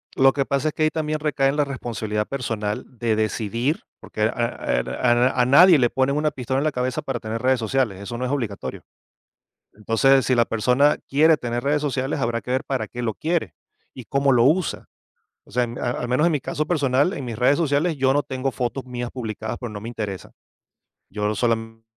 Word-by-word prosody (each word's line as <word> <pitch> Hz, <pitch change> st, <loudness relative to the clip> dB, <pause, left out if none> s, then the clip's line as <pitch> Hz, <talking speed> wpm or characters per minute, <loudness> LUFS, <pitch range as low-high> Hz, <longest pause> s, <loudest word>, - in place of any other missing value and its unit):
Lo 135 Hz, 0 st, +5 dB
que 140 Hz, -1 st, 0 dB
pasa 140 Hz, +2 st, 0 dB
es -, -, -7 dB
que 155 Hz, -, -1 dB
ahí 155 Hz, -, +4 dB
también 155 Hz, -1 st, -2 dB
recaen 140 Hz, -2 st, +1 dB
la 145 Hz, -1 st, +2 dB
responsabilidad 110 Hz, -6 st, -3 dB
personal 110 Hz, -6 st, -3 dB
de 115 Hz, -2 st, 0 dB
decidir, 110 Hz, -, -1 dB, 0.2 s
porque 105 Hz, -, -7 dB
a -, -, +5 dB, 0.5 s
er -, -, -4 dB
a 120 Hz, -, +1 dB
n 120 Hz, +2 st, +3 dB
a 125 Hz, -1 st, +3 dB
nadie 165 Hz, +6 st, +7 dB
le 120 Hz, -3 st, +3 dB
ponen 135 Hz, +2 st, +1 dB
una 150 Hz, 0 st, +1 dB
pistola 130 Hz, +1 st, -2 dB
en -, -, -1 dB
la 155 Hz, -, +1 dB
cabeza 125 Hz, 0 st, -2 dB
para 135 Hz, -3 st, -3 dB
tener 110 Hz, +1 st, -4 dB
redes 130 Hz, -1 st, +2 dB
sociales. 110 Hz, -4 st, 0 dB
Eso 120 Hz, +4 st, -6 dB
no 125 Hz, -, -2 dB
es 125 Hz, -, -2 dB
obligatorio. 115 Hz, -9 st, -4 dB, 0.9 s
Entonces, 115 Hz, +5 st, +3 dB
si 130 Hz, -, +2 dB
la 120 Hz, -, +4 dB
persona 125 Hz, +6 st, +2 dB
quiere 155 Hz, +3 st, +5 dB
tener 120 Hz, -1 st, -3 dB
redes 145 Hz, +1 st, +1 dB
sociales, 135 Hz, 0 st, -1 dB
habrá 115 Hz, -1 st, -1 dB
que -, -, -8 dB
ver 130 Hz, -, 0 dB
para 135 Hz, -1 st, -2 dB
qué 120 Hz, -, -7 dB
lo 110 Hz, -3 st, -1 dB
quiere 160 Hz, -, -2 dB, 0.4 s
y 130 Hz, -, -9 dB
cómo 140 Hz, +3 st, +1 dB
lo 120 Hz, -1 st, +4 dB
usa. 160 Hz, +5 st, +1 dB, 0.6 s
O -, -, -20 dB
sea, 125 Hz, +3 st, +1 dB
al 120 Hz, +1 st, -3 dB
menos 125 Hz, +6 st, +2 dB
en 170 Hz, -, +3 dB
mi 150 Hz, -, 0 dB
caso 150 Hz, +3 st, -3 dB
personal 145 Hz, 0 st, +1 dB
en 140 Hz, -, -5 dB
mis 115 Hz, -3 st, -5 dB
redes 130 Hz, +3 st, +3 dB
sociales, 155 Hz, 0 st, +1 dB
yo 130 Hz, 0 st, +3 dB
no 145 Hz, 0 st, +1 dB
tengo 130 Hz, -1 st, -3 dB
fotos 130 Hz, +1 st, -3 dB
mías 120 Hz, -1 st, -5 dB
publicadas, 110 Hz, -3 st, -5 dB
porque 120 Hz, -4 st, -6 dB
no 105 Hz, -, -7 dB
me 115 Hz, -, -6 dB
interesa. 105 Hz, -5 st, -6 dB, 0.8 s
Yo 105 Hz, +1 st, -2 dB
sola 115 Hz, -2 st, +2 dB
mente 115 Hz, 0 st, -10 dB
130 Hz, 215 wpm, -23 LUFS, 115-140 Hz, 0.9 s, nadie